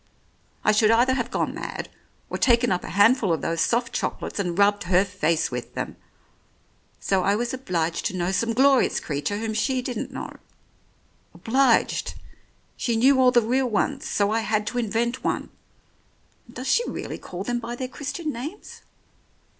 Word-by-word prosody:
I - - +4
should 215 0 +4
either 240 +3 +4
have 245 -2 -2
gone - - -1
mad, - - -5 0.4
or - - -5
taken 240 -3 +3
up 180 - 0
a - - -6
handful 205 +1 +4
of 165 - 0
those 165 0 -1
soft 235 0 +1
chocolates - - -3
and 175 -3 -2
rubbed 205 -1 +3
her 180 +2 +3
face 165 -5 0
with 125 -1 -6
them. - - -4 1.0
So 195 -1 +1
I 200 +2 +2
was 240 +3 -2
obliged 170 -10 -1
to 185 - -5
know 175 +1 0
some 230 +5 0
glorious 270 +2 +4
creature 145 +6 -3
whom 220 0 -3
she 255 +3 0
didn't 245 -3 -4
know. - - -7 1.0
Obliged! 255 0 +2 0.6
She 235 - -1
knew 265 +3 +5
all 255 - +6
the 240 -2 +4
real 255 +3 +1
ones, 215 - -1
so 205 0 +1
I 225 - +2
had 215 -1 0
to 245 - -1
invent 235 +2 -1
one. - - -2 1.0
And 235 - -17
does 255 +2 -5
she 480 - +2
really - - -5
call 180 +1 -7
them 240 +3 -1
by 240 +1 -5
their 255 +1 -4
Christian 290 +4 -5
names? 295 - -8
230 Hz, 175 wpm, -24 LUFS, 195-250 Hz, 1.0 s, all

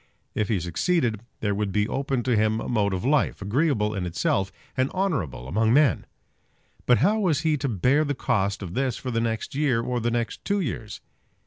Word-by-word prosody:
If 105 -2 -1
he 105 -5 +1
succeeded 110 - 0 0.2
there 105 -1 +1
would 100 0 -1
be 105 +1 +1
open 135 -1 -1
to 125 -1 +1
him 110 +1 +2
a - - -5
mode 105 -4 +1
of 95 +4 -3
life, 145 +2 +2
agreeable 105 0 +1
in 95 -3 -2
itself, 95 +3 0 0.2
and 130 +1 +1
honourable 140 - -2
among 110 - +2
men. 150 -1 +3 0.8
But 125 - +6
how 215 +3 +3
was 165 -8 +1
he 155 -1 +2
to 140 -1 -2
bear 125 - +2
the 145 -2 -1
cost 100 -4 0
of 90 -2 -6
this 130 0 0
for 130 - -5
the 115 -1 0
next 115 -1 -2
year, 135 -4 +1
or 125 +1 -1
the 120 +1 0
next 120 0 -2
two 200 0 0
years? 115 - -4
115 Hz, 205 wpm, -25 LUFS, 105-140 Hz, 0.8 s, But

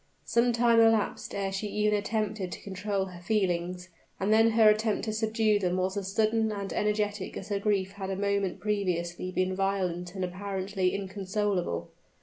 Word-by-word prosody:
Some 235 +1 +3
time 235 0 +4
elapsed 225 -2 +2
ere 195 -1 -1
she 195 +2 -3
even 210 +1 +1
attempted 210 -2 -2
to - - -8
control 195 0 -2
her 180 -2 -10
feelings; 180 -2 -1 0.3
and 200 +3 +2
then 225 +1 +6
her 220 -1 +6
struggle 215 0 -1
to 215 - -2
subdue 220 -1 +2
them 180 -2 0
was 185 +1 0
as 195 -1 -3
sudden 220 +1 +2
and 200 -2 -4
energetic 210 -2 -1
as - - -7
her 200 -1 0
grief 200 -2 0
had 195 -1 -6
a 195 - -1
moment 200 -1 0
previously 180 -4 -1
been 185 0 0
violent 185 -2 -1
and 190 -1 -1
apparently 190 0 -2
inconsolable. 195 - -2
200 Hz, 170 wpm, -29 LUFS, 185-215 Hz, 0.3 s, then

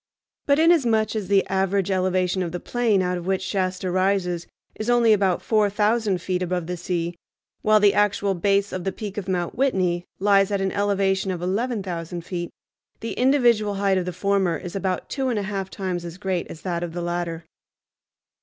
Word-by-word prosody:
But 280 0 +4
inasmuch 240 -10 +3
as 210 -4 -2
the 195 0 +3
average 195 0 0
elevation 185 0 +1
of 175 -2 -2
the 175 - -4
plain 225 -5 +1
out 180 0 -1
of 175 - -8
which 190 0 0
Shasta 185 -1 -1
rises 185 -2 0 0.3
is 215 +2 -4
only 240 -2 +5
about 195 -3 +1
four 215 -2 +2
thousand 210 -2 +1
feet 185 -1 -1
above 180 -1 -1
the 180 +2 -3
sea, 175 -1 -2 0.5
while 215 0 +4
the 205 -1 +5
actual 205 -1 +2
base 200 +2 +1
of 185 -1 -3
the 195 - -1
peak 205 0 -5
of 195 - -8
Mount 175 -2 -1
Whitney 185 -10 0
lies 195 0 +4
at 200 -1 0
an 190 0 0
elevation 195 -1 +1
of 180 -2 -2
eleven 215 +4 -1
thousand 170 -1 -5
feet, 175 -2 -4 0.5
the 230 - -4
individual 240 -6 +3
height 195 -1 +2
of 180 - -3
the 180 - -3
former 190 -2 +1
is 180 +4 -8
about 190 -2 -2
two 270 -2 -2
and 240 -4 0
a 205 - -1
half 195 -1 -3
times 185 -3 -3
as 170 0 -8
great 190 -2 -2
as 160 - -10
that 175 -2 -2
of 175 -2 -4
the 175 - -4
latter. 170 -1 -3
190 Hz, 200 wpm, -23 LUFS, 180-205 Hz, 0.5 s, only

